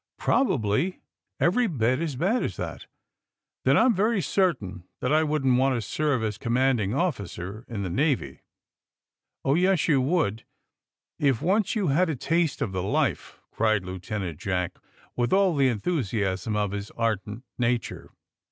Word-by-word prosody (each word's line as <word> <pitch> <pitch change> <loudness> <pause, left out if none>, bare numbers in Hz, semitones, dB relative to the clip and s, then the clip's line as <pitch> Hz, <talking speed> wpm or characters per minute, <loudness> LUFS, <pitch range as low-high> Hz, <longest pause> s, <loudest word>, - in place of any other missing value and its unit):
*' - - -66
Probably 150 - +1 0.4
every 235 +8 +3
bit 130 - +1
as 160 -4 -2
bad 195 - +1
as - - -2
that." - - -6 0.8
^'Then - - +4
I'm 255 - +5
very 215 +2 +1
certain 135 - 0 0.2
tliat 125 - -1
I 155 - +5
wouldn't 135 -5 +2
want 135 0 +2
to 120 - -1
serve 145 -4 0
as 105 -1 -3
commanding 120 -3 +1
officer 105 - -3
in 105 -4 -4
the 95 - -3
Navy!" 140 - +1
^ - - -22 0.7
' - - -47
Oh, 135 - +3
yes, 180 +1 +2
you 140 -4 +4
would, 135 - 0 0.8
if 135 -5 +2
once 200 +4 +1
you 200 -7 +1
had 170 +6 +2
a 155 - -1
taste 165 +1 0
of 110 - -3
the 95 -1 -2
life!" 95 - -1
cried 110 -3 +1
Lieutenant 95 -2 -5
Jack, 90 -2 -2 0.4
with 120 -1 0
all 190 -3 +3
the 135 -2 +4
enthusiasm 105 - -1
of 105 -2 0
his 100 0 -5
ardent 110 0 -2 0.2
nature. 120 -1 -1
130 Hz, 160 wpm, -26 LUFS, 105-165 Hz, 0.8 s, I'm